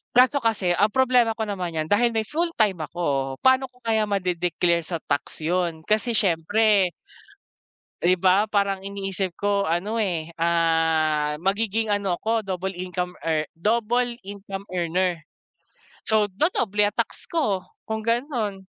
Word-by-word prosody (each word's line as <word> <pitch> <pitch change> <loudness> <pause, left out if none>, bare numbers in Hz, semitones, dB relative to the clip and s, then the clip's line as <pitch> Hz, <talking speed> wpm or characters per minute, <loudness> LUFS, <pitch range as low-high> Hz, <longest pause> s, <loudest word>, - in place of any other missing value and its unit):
Kaso 255 +3 +5
kasi 220 -6 0
ang 205 +3 +4
problema 250 -3 +3
ko 220 - -2
naman 185 -5 -4
yan 155 0 -1
dahil 235 +3 +3
may 220 - +1
full 330 +9 -1
time 200 -6 +2
ako 140 -5 -2
pano 260 0 +4
ko 250 - -28
kaya 220 -2 +1
made-declare 180 -3 0
sa 170 -2 -4
tax 150 - -2
yun 170 -1 -1
kasi 220 +2 +1
siyempre, 200 +2 +3 1.2
Di 180 - +5
ba 185 +3 +3
parang 200 -2 0
iniisip 195 -2 -3
ko 200 -1 +1
ano 175 +7 -1
eh. 175 -7 -1
Ah, 160 -2 +2
magiging 215 +3 0
ano 200 -3 0
ko 225 -1 0
double 190 0 -3
income 180 0 -4
ear 155 -2 0
double 235 +5 +1
income 195 0 -8
earner. 180 0 0 0.9
So 215 -2 +4
dodoble 210 - +1
ang 210 - -5
tax - - -3
ko 275 - 0 0.2
kung 220 0 -3
ganun. 230 -4 -2
195 Hz, 145 wpm, -24 LUFS, 175-220 Hz, 1.2 s, Kaso